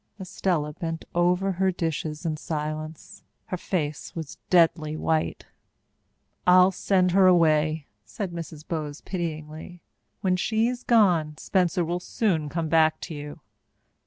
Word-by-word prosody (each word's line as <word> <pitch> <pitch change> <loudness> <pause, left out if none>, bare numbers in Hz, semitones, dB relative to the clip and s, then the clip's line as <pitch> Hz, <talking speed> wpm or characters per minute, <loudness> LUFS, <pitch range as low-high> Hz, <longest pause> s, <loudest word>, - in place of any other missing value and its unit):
Estella 180 -5 -1
bent 165 +1 -5
over 180 +3 +2
her 190 +1 +1
dishes 160 -2 -3
in 160 -2 0
silence. 155 0 -5 0.2
Her 185 - -4
face 155 -5 -3
was 160 -4 -7
deadly 160 -3 +3
white. 160 0 -1 1.0
"I'll 180 +1 +7
send 185 -1 +2
her 190 +1 +5
away," 155 -3 +3 0.2
said 140 - -5
Mrs. 165 -2 -8
Bowes 150 -3 -4
pityingly. 160 -1 -6 0.4
"When 185 -1 +2
she's 230 +5 0
gone, 175 -11 +3
Spencer 180 -1 +1
will 175 +2 -2
soon 175 -6 -1
come 165 +1 -2
back 155 0 +3
to 170 - -6
you." 145 0 -8
165 Hz, 130 wpm, -26 LUFS, 155-180 Hz, 1.0 s, I'll